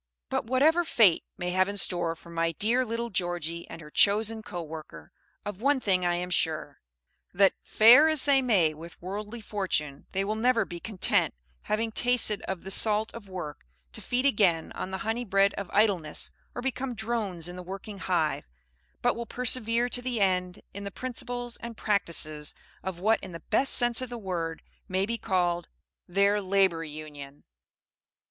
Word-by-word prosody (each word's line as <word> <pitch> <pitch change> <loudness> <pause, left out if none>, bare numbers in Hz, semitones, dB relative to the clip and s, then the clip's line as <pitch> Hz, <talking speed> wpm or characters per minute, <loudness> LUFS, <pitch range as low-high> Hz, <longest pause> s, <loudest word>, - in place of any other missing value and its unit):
But - - -1
whatever 295 +8 +3
Fate 220 - +4
may 180 0 -2
have 185 +1 +2
in 205 - -4
store 175 -4 +1
for 170 +1 -14
my 165 0 0
dear 230 +9 +2
little 235 0 -4
Georgie 175 -2 -3
and 165 - -9
her 150 -1 -12
chosen 220 +4 +3
co 175 -5 -6
worker, 155 -1 -10 0.3
of 205 -1 -6
one 280 +1 +3
thing 190 -6 +1
I 175 - +1
am 180 +1 -4
sure, 155 -4 -1 0.5
that, 195 0 +5
fare 245 +8 +7
as 310 -3 +4
they 275 -2 +4
may 195 -11 +3
with 165 +2 -11
worldly 210 +5 -6
fortune, 185 -10 -2
they 195 +1 -1
will 210 - -1
never 230 +2 +2
be 175 -1 -8
content, 195 - +1 0.3
having 225 +1 -1
tasted 240 -3 +2
of 190 -2 -4
the 195 - -7
salt 215 +2 +3
of 220 -4 -10
work, 150 - -7 0.3
to - - -7
feed 250 +2 -1
again 195 -11 +3
on - - -5
the 190 - -3
honey 225 +2 -1
bread 195 -2 +3
of 200 -3 -6
idleness, 195 -7 +1 0.2
or 245 - -5
become 260 -1 -3
drones 215 -6 -2
in 180 - -7
the 180 - -7
working 195 +2 -8
hive, 160 - -1 0.5
but - - +3
will 235 0 -5
persevere 240 -1 0
to 245 - 0
the 245 -2 -2
end 180 -2 0
in 200 - -7
the 200 - -4
principles 245 +1 -5
and 235 -1 -8
practices 160 -7 0 0.3
of 190 -2 -5
what 215 +5 +2
in 180 - -9
the 165 - -9
best 270 - +3
sense 240 0 +5
of 255 - -4
the 240 - -6
word 170 -6 -4 0.2
may 190 +1 0
be 230 +2 -3
called 175 -2 0 0.4
their 200 +3 +2
Labor 190 -3 +2
Union. 150 -2 -9
200 Hz, 180 wpm, -28 LUFS, 175-230 Hz, 0.5 s, fare